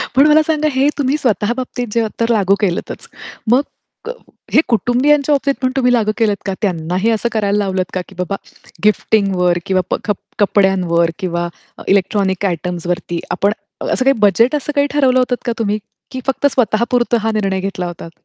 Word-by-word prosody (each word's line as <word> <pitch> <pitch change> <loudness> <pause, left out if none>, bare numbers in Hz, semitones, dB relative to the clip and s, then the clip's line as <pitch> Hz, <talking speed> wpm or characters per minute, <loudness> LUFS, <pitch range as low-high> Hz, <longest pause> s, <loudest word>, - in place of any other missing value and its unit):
पण 275 +3 +6
मला 305 +1 +6
सांगा 310 -1 +1
हे 270 +2 +3
तुम्ही 285 0 +1
स्वतः 235 -5 0
बाबतीत 245 -1 -4
जे 230 -1 +1
तर 230 0 +1
लागू 200 -3 +3
केलंतच. 185 -4 -2 0.4
मग 250 +3 +5 0.4
क 470 - -3 0.4
हे - - +6
कुटुंबियांच्या 260 +6 +2
बाबतीत 280 0 +1
पण 255 -1 +1
तुम्ही 250 -2 +3
लागू 220 -3 +2
केलंत 210 -3 +1
का? 195 - -1
त्यांनाही 180 +1 0
असं 225 +1 0
करायला 205 -2 +1
लावलत 190 -2 0
का, 185 - -1
की 190 - -15
बाबा 180 +2 -2 0.5
गिफ्टिंगवर 195 -4 +2
किंवा 190 -1 +1
प - - +3
ख 210 - +1 0.3
कपड्यांवर 185 -5 +2
किंवा 175 -2 -2 0.3
अ, - - -10
इलेक्ट्रॉनिक 195 0 +1
आयटम्सवरती 175 -1 -2
आपण 195 +3 +1 0.3
अ, - - -3
असं 255 - +1
काही 270 -1 +4
बजेट 220 +7 +4
असं 295 0 -2
काही 285 0 +3
ठरवलं 265 -3 +3
होतं 250 0 +1
का 240 - 0
तुम्ही? 210 -1 0 0.3
की 260 - -5
फक्त 270 +1 -1
स्वतः 235 -4 +1
पुरतं 240 -1 +2
हा 225 +1 0
निर्णय 195 -3 0
घेतला 190 -2 -3
होतात? 170 -1 -8
210 Hz, 185 wpm, -17 LUFS, 190-255 Hz, 0.5 s, पण